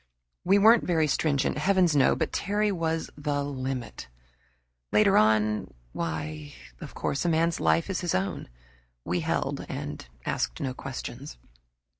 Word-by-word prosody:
We 195 +3 +4
weren't 220 +3 +6
very 165 -3 +2
stringent, 140 -1 0
heavens 180 -1 +3
no! 135 -2 +4
But - - -2
Terry 205 +1 0
was 165 -3 -2
"the 145 -1 -2
limit." 130 - -5 0.8
Later 200 -2 +4
on 105 -2 +3 0.2
why, 80 -2 -5 0.2
of - - -9
course 140 - -2
a 175 - +1
man's 165 +1 +1
life 165 - +2
is 190 -3 -2
his 175 - -1
own, 95 +2 -2 0.6
we - - 0
held, - - -2
and 75 0 -5 0.2
asked - - -2
no 130 -2 -2
questions. 130 - -7
145 Hz, 140 wpm, -27 LUFS, 110-175 Hz, 0.8 s, weren't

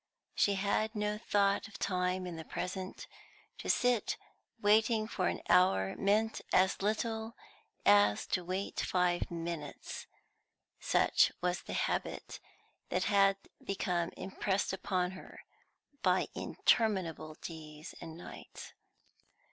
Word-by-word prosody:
She 200 - +3
had 205 +3 0
no 210 0 -1
thought 200 -1 +2
of 220 - -11
time 185 -1 0
in 175 -2 -5
the 160 - -6
present; 185 +3 -5 0.5
to - - -5
sit 245 -3 +2 0.4
waiting 215 +1 +3
for 185 -4 -1
an - - -2
hour 95 - +4
meant 215 +3 +1
as 190 +1 +3
little 220 +2 -1 0.5
as 205 - +5
to 180 - +1
wait 185 +3 -3
five 180 -1 +1
minutes; 165 -3 -5 0.7
such - - +4
was 180 0 0
the - - -7
habit - - -2 0.5
that - - +1
had 195 -1 +4 0.3
become 180 -3 -1
impressed 190 +1 -1
upon 185 -1 0
her 190 - -11 0.6
by - - +2
interminable 185 -8 +1
days 155 -1 -9
and 165 -1 -8
nights. 175 - -10
190 Hz, 115 wpm, -33 LUFS, 175-210 Hz, 0.7 s, as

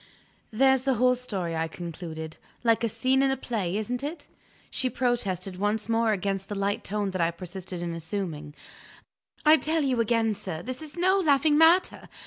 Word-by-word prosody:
"There's 265 +3 +3
the 265 0 +1
whole 250 +2 +4
story," 195 -9 -3
I 160 0 0
concluded. 160 -1 -7 0.3
"Like 230 -1 +3
a 230 - +2
scene 260 +5 +1
in 275 - +3
a 270 - 0
play, 200 -6 -2
isn't 240 +3 -3
it?" 300 +4 -5 0.5
She 260 -2 +1
protested 200 -7 -1
once 210 +2 0
more 230 -1 +2
against 195 -1 -2
the 205 - -3
light 200 +1 -1
tone 205 -1 -2
that 185 -2 -2
I 165 - +3
persisted 180 +1 -7
in 170 -1 -3
assuming. 160 -3 -5 0.9
"I 310 +1 +8
tell 315 +3 0
you 255 -4 +1
again, 225 -1 +2
sir, 185 -5 -6
this 255 +3 -3
is 310 +2 -9
no 375 +3 +3
laughing 295 -3 +3
matter. 325 +4 +4
220 Hz, 180 wpm, -27 LUFS, 185-260 Hz, 0.9 s, I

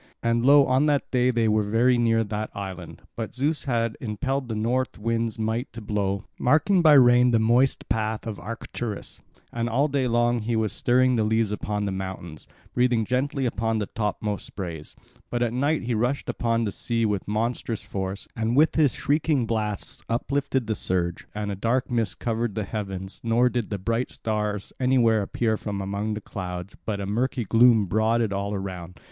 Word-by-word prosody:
And 115 0 +1
lo, 140 +1 +7
on 130 +4 +3
that 145 -2 0
day 125 -1 +3
they 115 -2 +2
were 110 0 +3
very 115 +5 +3
near 115 -1 +2
that 105 0 -4
island. 95 -4 -7
But 115 -2 -5
Zeus 150 +4 -1
had 115 -4 0
impelled 130 +4 -2
the 115 - -3
north 125 +4 -1
wind's 115 0 -1
might 110 +3 -2
to 115 - -7
blow, 100 -2 -2
marking 165 +8 +3
by 155 -3 +7
rain 125 -2 +6
the 115 - +3
moist 120 +4 +2
path 110 0 -1
of 110 -3 -5
Arcturus; 115 -1 -6 0.3
and 115 0 -1
all 135 +6 +2
day 135 -3 0
long 120 0 +2
he 115 +2 -1
was 110 -2 0
stirring 125 0 +3
the 110 - +2
leaves 110 0 +1
upon 105 0 -2
the 100 - -1
mountains, 95 -4 -6 0.3
breathing 120 -2 +2
gently 135 +3 0
upon 115 -1 0
the 105 - -1
topmost 105 0 -3
sprays; 85 -6 -7 0.3
but 120 0 0
at 120 -1 -1
night 145 +5 +1
he 120 0 -1
rushed 120 +5 -1
upon 115 -1 0
the 105 - -1
sea 115 +1 -1
with 105 -3 -1
monstrous 115 0 -2
force, 95 -1 -5
and 115 +2 0
with 155 +2 +5
his 150 -5 +3
shrieking 145 -2 +1
blasts 105 -3 -3
uplifted 135 +2 0
the 110 - -1
surge; 90 -4 -2
and 105 -1 -2
a - - -3
dark 120 +6 0
mist 115 -5 0
covered 115 -2 -2
the 110 - -1
heavens, 95 -2 -5
nor 120 +2 +3
did 120 -3 -2
the 100 - -2
bright 115 +6 -1
stars 105 -2 -3
anywhere 125 -4 +3
appear 110 +2 0
from 100 -2 -4
among 100 +2 -2
the 105 - -5
clouds, 90 -1 -6
but 105 -2 -1
a 100 - -3
murky 120 +5 -1
gloom 115 0 +5
brooded 110 +2 +1
all 100 +1 -2
around. 90 -2 -6
115 Hz, 190 wpm, -25 LUFS, 105-125 Hz, 0.3 s, lo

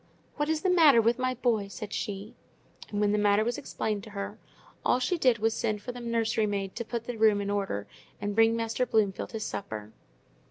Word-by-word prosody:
"What 295 +1 0
is 315 -1 0
the 375 - +2
matter 310 -9 +7
with 230 +2 +2
my 255 0 0
boy?" 230 -5 +1
said 215 +1 -7
she. 200 +1 -4 0.6
And 205 - -3
when 205 -1 +3
the 210 - +2
matter 205 0 +4
was 240 +1 -2
explained 210 -2 -3
to - - -10
her, 200 -1 -6 0.4
all - - +3
she 255 +8 0
did 255 -8 +3
was 220 +1 +1
to - - -5
send 215 -2 -1
for 245 - -4
the 245 - -8
nursery 230 -2 0
maid 195 -2 -3
to - - -2
put 235 0 -4
the 240 0 -5
room 215 -2 +5
in 200 0 -2
order, 195 - -2 0.3
and 205 0 -2
bring 225 +1 +4
Master 230 +2 -1
Bloomfield 210 -2 0
his 220 -1 -3
supper. 110 - -6
220 Hz, 225 wpm, -29 LUFS, 205-240 Hz, 0.6 s, matter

